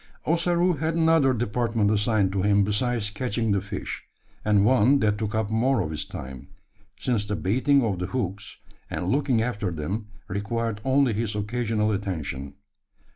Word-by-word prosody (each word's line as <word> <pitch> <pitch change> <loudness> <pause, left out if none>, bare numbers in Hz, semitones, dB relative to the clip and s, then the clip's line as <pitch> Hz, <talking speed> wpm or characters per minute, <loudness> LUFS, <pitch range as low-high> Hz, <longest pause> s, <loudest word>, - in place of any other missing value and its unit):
Ossaroo 175 +2 +2
had 160 +3 -1
another 160 -4 +4
department 115 -2 0
assigned 105 -2 +2
to 95 -1 -1
him 100 +1 +4
besides 105 +1 0
catching 115 0 -1
the 100 -1 +2
fish; 100 0 -6 0.4
and 105 -1 +3
one 130 +3 +5
that 105 -3 +1
took 110 0 -2
up 110 -1 -1
more 125 +3 +2
of 75 - -3
his 75 - -3
time: 65 -1 -8 0.5
since 120 -5 0
the 105 0 -3
baiting 130 +8 +2
of 100 -6 -1
the 90 - -2
hooks, 105 -5 -3 0.3
and 90 - -3
looking 130 -4 +2
after 105 -5 -2
them, 90 +7 -4 0.2
required 105 +2 -2
only 135 -2 +3
his 105 0 -2
occasional 110 0 0
attention. 80 -9 -4
110 Hz, 160 wpm, -25 LUFS, 100-125 Hz, 0.5 s, one